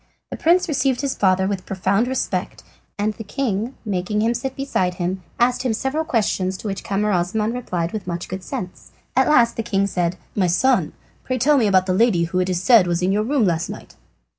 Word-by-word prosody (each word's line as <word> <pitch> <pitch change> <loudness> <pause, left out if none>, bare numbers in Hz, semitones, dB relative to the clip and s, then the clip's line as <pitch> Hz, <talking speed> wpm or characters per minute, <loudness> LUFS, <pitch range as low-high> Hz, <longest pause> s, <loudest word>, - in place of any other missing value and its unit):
The - - -3
prince 350 +3 +3
received 270 -4 0
his 280 -2 -1
father 190 -1 +2
with 190 -2 -3
profound 195 +4 +1
respect, 260 +1 -3 0.3
and 210 +1 0
the 225 - -8
king, 230 0 -2
making 205 +1 -1
him 230 +1 +2
sit 260 +3 -4
beside 190 -10 -1
him, 180 +1 -2 0.2
asked 250 +1 +2
him 255 -3 0
several 270 +7 -2
questions, 190 -7 0
to 215 - -7
which 195 -1 -4
Camaralzaman 205 +2 0
replied 180 -9 -3
with 210 -4 -5
much 175 -1 -4
good 185 +1 -5
sense. 180 0 -7 0.3
At 265 +3 +3
last 240 -6 +4
the - - 0
king 200 -3 0
said: 180 -3 -1 0.2
"My 190 -3 +2
son, 190 0 +2 0.3
pray 255 - -2
tell 290 +5 +3
me 225 - +3
about 185 -2 +3
the 185 - 0
lady 190 -4 +3
who, 170 +2 -1
it 185 0 0
is 180 0 -1
said, 220 -4 +6
was 175 +1 0
in 185 - +2
your 205 +2 +2
room 260 0 +1
last 170 -2 0
night." - - -9
205 Hz, 215 wpm, -21 LUFS, 185-245 Hz, 0.3 s, said